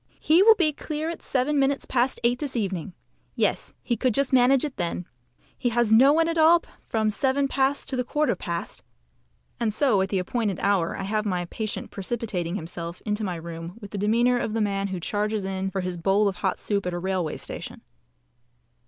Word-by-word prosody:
"He 325 +4 +4
will 440 +2 +8
be 315 -6 +2
clear 310 +2 -4
at 335 - -8
seven 280 +3 0
minutes 275 0 +1
past 255 +1 0
eight 245 +1 +2
this 285 -4 -4
evening. 190 -5 -2 0.4
Yes, - - -1
he 240 - 0
could 245 0 0
just 275 -1 +1
manage 260 +2 +5
it 290 - -6
then. 175 0 -2 0.5
He 245 - -1
has 235 -1 +1
no 255 +6 +7
one 325 +2 +3
at 335 0 0
all 335 +2 +6 0.3
from 220 -1 +1
seven 270 +5 +1
past 275 +1 0
to 265 - -1
the 250 - 0
quarter 295 0 0
past" 170 -1 -5 0.8
and 230 -2 +1
so 215 -3 +2
at 190 - -1
the 195 - 0
appointed 200 +1 -1
hour 195 -4 +1
I - - -4
have 215 +2 -1
my 180 -4 -1
patient 215 +4 -5
precipitating 195 -4 -3
himself 170 -1 -6
into 210 0 -1
my 185 -4 -2
room 165 +2 -7
with 205 -3 -10
the 205 - -4
demeanour 235 +4 +3
of 220 - -2
the 225 - 0
man 200 -1 0
who 190 -2 -4
charges 210 +3 -1
in 190 0 -2
for 190 0 -2
his 180 -1 -4
bowl 195 +4 +2
of 190 -2 -2
hot 190 0 -1
soup 200 -3 -2
at 180 - -2
a - - -2
railway 180 -3 -2
station. - - -7
215 Hz, 205 wpm, -25 LUFS, 190-260 Hz, 0.8 s, will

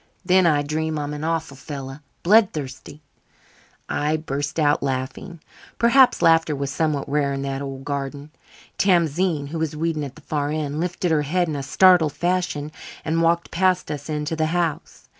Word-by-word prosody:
Then 185 -1 +4
I 145 -3 +3
dream 155 +1 -2
I'm 145 0 -3
an 150 +1 -6
awful 160 -3 -2
fellow 135 0 -7 0.2
blood 205 +2 +5
thirsty." 145 0 -7 0.8
I 150 +2 0
burst 145 0 -3
out 145 -1 +3
laughing. 135 +6 -4 0.4
Perhaps 250 +2 +5
laughter 165 -2 +4
was 140 0 -3
somewhat 150 -2 -1
rare 140 -1 0
in 135 0 -3
that 135 0 -3
old 135 -1 -6
garden. 140 +1 -4 0.5
Tamzine, 170 -4 +2
who 165 +2 -4
was 160 -1 -2
weeding 160 -1 -1
at 135 -2 -7
the - - -14
far 145 -1 -2
end, 150 -1 -2
lifted 175 0 -1
her 155 -2 +3
head 175 +5 0
in 155 - -3
a 140 - -3
startled 175 +1 +4
fashion 175 -2 -1 0.3
and 165 +1 +1
walked 170 +1 +1
past 180 -2 +1
us 145 +1 -6
into 150 +1 -2
the 160 0 0
house. 165 -2 -3
155 Hz, 175 wpm, -22 LUFS, 145-170 Hz, 0.8 s, blood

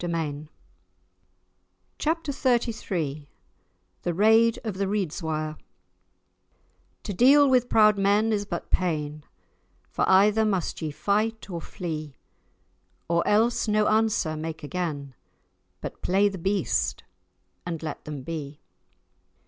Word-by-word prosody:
*Chapter 320 -1 -1
XXXIII* 210 - -1 0.7
*The 175 - -1
Raid 220 +3 +4
of 210 -4 -4
the 195 - 0
Reidswire* 160 -6 -2 1.4
"To 205 - -4
deal 280 +8 +6
with 250 -2 +3
proud 215 -2 +5
men 205 +3 +3
is 205 -1 0
but - - -5
pain, 150 -4 -1 0.7
For - - 0
either 205 +3 +5
must 195 -6 -1
ye 160 - -2
fight 215 +8 -1
or 170 -1 -4
flee, 155 -6 -6 0.9
Or 170 0 +2
else 225 +3 +2
no 210 0 +2
answer 215 -7 +1
make 155 0 -6
again, 145 -4 -4 0.7
But - - -7
play 200 +3 +3
the 195 -2 -7
beast, 195 +1 0 0.6
and 165 -2 -5
let 155 -2 -5
them 150 -3 -6
be." 150 -2 -6
195 Hz, 110 wpm, -26 LUFS, 155-220 Hz, 1.4 s, deal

